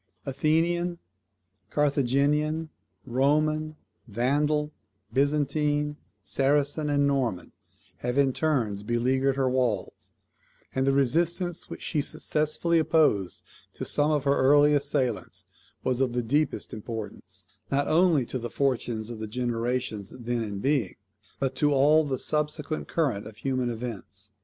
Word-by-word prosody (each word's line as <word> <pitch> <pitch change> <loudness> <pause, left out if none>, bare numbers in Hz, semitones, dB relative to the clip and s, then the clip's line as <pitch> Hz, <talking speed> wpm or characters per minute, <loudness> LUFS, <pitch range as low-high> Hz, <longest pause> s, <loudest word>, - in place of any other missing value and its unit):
Athenian, 170 +5 +1 0.7
Carthaginian, 150 +3 +1 0.4
Roman, 155 +4 +1 0.3
Vandal, 145 +7 +1 0.4
Byzantine, 145 +1 +1 0.3
Saracen, 145 +6 +1
and 145 0 +2
Norman, 130 -10 -1 0.5
have 125 +2 -3
in 135 -2 +3
turns 120 -11 0
beleaguered 130 +5 +1
her 135 -1 +1
walls; 125 -6 -1 0.6
and 130 +1 0
the - - +5
resistance 170 +6 0
which - - -8
she 150 - 0
successfully 155 +4 0
opposed 150 - +2 0.3
to - - -6
some 145 +1 +2
of 150 -3 +1
her 140 0 +2
early 145 +2 +5
assailants 140 -5 -1 0.4
was 130 0 0
of 130 -2 +1
the 120 0 0
deepest 145 +7 0
importance, 105 -4 -7 0.2
not 140 +1 +1
only 160 -5 +4
to 130 - -4
the 120 0 -5
fortunes 120 -4 -1
of 115 - -7
the 110 - -4
generations 120 -2 -2
then 120 -1 -3
in 105 -2 -5
being, 130 -3 0 0.4
but 135 -1 0
to 145 -1 +3
all 150 +4 +5
the 135 -3 -2
subsequent 150 +1 -2
current 125 -12 -1
of 110 -1 -12
human 130 +1 -1
events. 115 -3 -7
135 Hz, 130 wpm, -27 LUFS, 120-150 Hz, 0.7 s, the